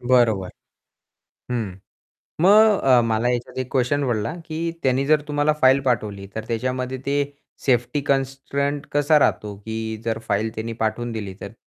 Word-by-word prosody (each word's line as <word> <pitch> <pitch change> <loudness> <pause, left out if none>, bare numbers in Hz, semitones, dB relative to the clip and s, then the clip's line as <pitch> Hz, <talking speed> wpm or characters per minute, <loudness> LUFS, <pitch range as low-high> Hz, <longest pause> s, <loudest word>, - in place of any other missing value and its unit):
बरोबर. 120 -7 +2 1.0
हं. 110 -6 -2 0.7
मग 210 +2 +6
अ, 130 -2 +5
मला 115 +1 +1
ह्याच्यात 125 +1 -2
एक 130 -1 -3
क्वेशन 135 +1 +1
पडला, 120 +6 -1
की 165 +1 -2
त्यांनी 130 +1 +2
जर 155 0 +4
तुम्हाला 145 +1 +2
फाइल 130 +1 +5
पाठवली, 105 -6 -1
तर 110 0 -4
त्याच्यामध्ये 125 +2 -2
ते 140 +1 +1 0.4
सेफ्टी 125 +2 +2
कन्स्ट्रेंट 140 +1 -1
कसा 145 +1 +4
राहतो, 105 -7 0
की 110 +2 -5
जर 115 -1 -1
फाइल 105 +2 +1
त्यांनी 115 +1 -4
पाठवून 115 +2 -1
दिली 100 -4 -5
तर. 100 - -7
125 Hz, 150 wpm, -22 LUFS, 110-140 Hz, 1.0 s, मग